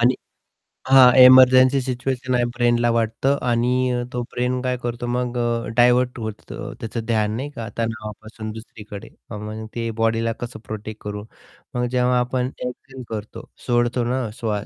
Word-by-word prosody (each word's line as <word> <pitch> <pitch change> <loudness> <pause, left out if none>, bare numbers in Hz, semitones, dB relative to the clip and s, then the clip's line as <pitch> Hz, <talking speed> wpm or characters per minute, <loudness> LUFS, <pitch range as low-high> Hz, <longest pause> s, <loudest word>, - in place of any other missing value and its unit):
आणि 125 +2 +4 0.7
हां, 130 -2 +8
emergency 130 +1 +7
situation 130 0 -2
आहे 120 - +2
ब्रेनला 120 -1 +2
वाटतं 115 +5 0
आणि 120 +1 +1 0.2
अ, 120 0 -1
तो 125 - -2
ब्रेन 125 +1 -1
काय 125 -1 -1
करतो 120 0 -3
मग 125 0 -2
अ, 120 -1 -1
डायव्हर्ट 125 0 +3
होतं 110 -2 -7
त्याचं 115 0 -5
ध्यान, 110 -2 0
नाही 140 +4 -4
का, 115 -2 -5
तणावापासून 110 -1 -5
दुसरीकडे. 110 -2 -10 0.2
आणि 105 - -5
मग 110 +1 -6
ते 115 -1 -2
बॉडीला 115 0 +1
कसं 120 0 -7
प्रोटेक्ट 110 0 -7
करू? 105 0 -5 0.5
मग 125 0 0
जेव्हा 125 0 +1
आपण 125 +1 -1 0.2
एक्झेल 130 +1 -9
करतो, 110 -1 -7 0.2
सोडतो 120 0 +1
ना 125 -1 -1
श्वास. 105 -2 -2
120 Hz, 155 wpm, -22 LUFS, 110-125 Hz, 0.7 s, हां